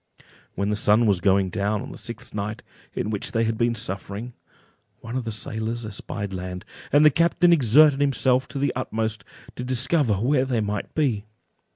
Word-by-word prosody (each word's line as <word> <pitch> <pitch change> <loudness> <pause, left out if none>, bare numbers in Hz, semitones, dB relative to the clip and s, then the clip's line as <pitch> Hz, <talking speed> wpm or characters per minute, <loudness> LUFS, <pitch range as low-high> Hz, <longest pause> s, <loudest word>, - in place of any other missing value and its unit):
When 100 +2 -1
the - - +1
sun 105 +2 +4
was 100 -4 +2
going 95 +1 +2
down 105 +2 -1
on - - -8
the - - -9
sixth 115 +1 -6
night 105 +1 -4 0.3
in 105 - -2
which 105 - -3
they 115 -1 +2
had 115 0 0
been 120 +1 +1
thus 115 -1 -2
suffering, 100 +3 -5 0.7
one 115 +2 -7
of 130 -2 -2
the 115 - -3
sailors 110 +2 -3
espied 100 -1 -6
land, 90 0 -6 0.3
and 145 +2 +5
the 150 - +8
captain 170 +3 +3
exerted 145 +1 +5
himself 130 -2 +2
to - - -7
the 140 +1 0
utmost 110 -4 -3 0.3
to 125 - -4
discover 130 -1 +1
where 130 +6 +1
they 125 -3 0
might 105 -1 -3
be. 125 -9 0
115 Hz, 190 wpm, -24 LUFS, 105-130 Hz, 0.7 s, the